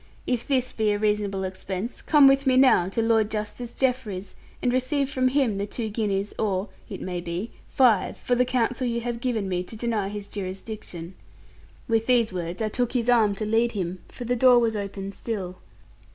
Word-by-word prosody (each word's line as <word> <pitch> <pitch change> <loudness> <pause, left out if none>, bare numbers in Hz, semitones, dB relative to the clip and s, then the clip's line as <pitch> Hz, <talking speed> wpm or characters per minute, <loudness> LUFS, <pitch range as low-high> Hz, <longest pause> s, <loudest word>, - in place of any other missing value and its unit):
If 245 -2 -1
this 255 -3 0
be 215 -2 +1
a - - 0
reasonable 205 -2 0
expense, 190 +3 -5
come 295 -3 +6
with 275 0 +4
me 255 -1 +4
now 255 -9 +5
to 225 +3 -1
Lord 225 -2 +3
Justice 220 +3 -4
Jeffreys, 235 -8 -2 0.3
and 245 - 0
receive 270 +2 0
from 255 -1 +2
him 255 -6 +1
the 200 - -2
two 225 +1 -4
guineas, 205 -2 -1
or 200 -2 0 0.2
(it - - -6
may 180 -1 -3
be) 175 +6 -4 0.2
five, 235 -8 +3
for 250 - -1
the 250 +1 +4
counsel 250 0 0
you 235 0 -1
have 235 0 -4
given 235 -6 -1
me 180 -1 -1
to 180 +5 -9
deny 220 -3 -1
his 205 0 -6
jurisdiction.' 190 -3 -6 0.7
With 225 -1 +1
these 235 -5 +3
words, 175 +3 -3
I 215 - 0
took 245 +2 -1
his 245 -1 +2
arm 215 -4 +4
to 215 - -3
lead 230 +2 +2
him, 185 -3 -3
for 245 - -8
the 245 +1 +1
door 250 0 +6
was 230 -2 +2
open 200 -1 -4
still. 195 -4 -5
220 Hz, 195 wpm, -25 LUFS, 195-245 Hz, 0.7 s, come